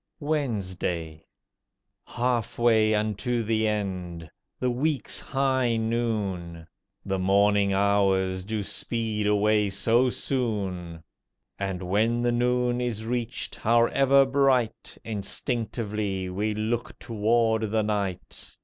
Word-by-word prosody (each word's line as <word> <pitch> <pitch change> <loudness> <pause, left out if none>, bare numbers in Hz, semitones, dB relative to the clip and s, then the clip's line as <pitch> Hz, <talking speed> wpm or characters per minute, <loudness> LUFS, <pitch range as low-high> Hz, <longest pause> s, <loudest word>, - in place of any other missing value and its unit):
WEDNESDAY 95 - -2 0.8
Half 120 -2 -1
way 110 -2 +4
unto 110 +3 -1
the 110 0 +1
end—the 95 +1 -4
week's 140 +3 -1
high 130 -4 +1
noon. 105 -8 -2 0.4
The 95 -1 -1
morning 100 +1 +3
hours 95 -2 +2
do 105 +1 -3
speed 110 0 -2
away 105 0 +3
so 115 +6 +2
soon! 95 - -3 0.6
And, 95 -2 -3
when 110 +6 +1
the 120 - +2
noon 125 0 +1
is 110 -3 -3
reached, 120 -1 -3
however 135 +4 +4
bright, 130 -4 +1
Instinctively 105 -2 -3
we 105 +3 -1
look 115 +2 -2
toward 110 0 +1
the 110 +1 +1
night. 100 -4 -4
110 Hz, 100 wpm, -26 LUFS, 100-120 Hz, 0.8 s, way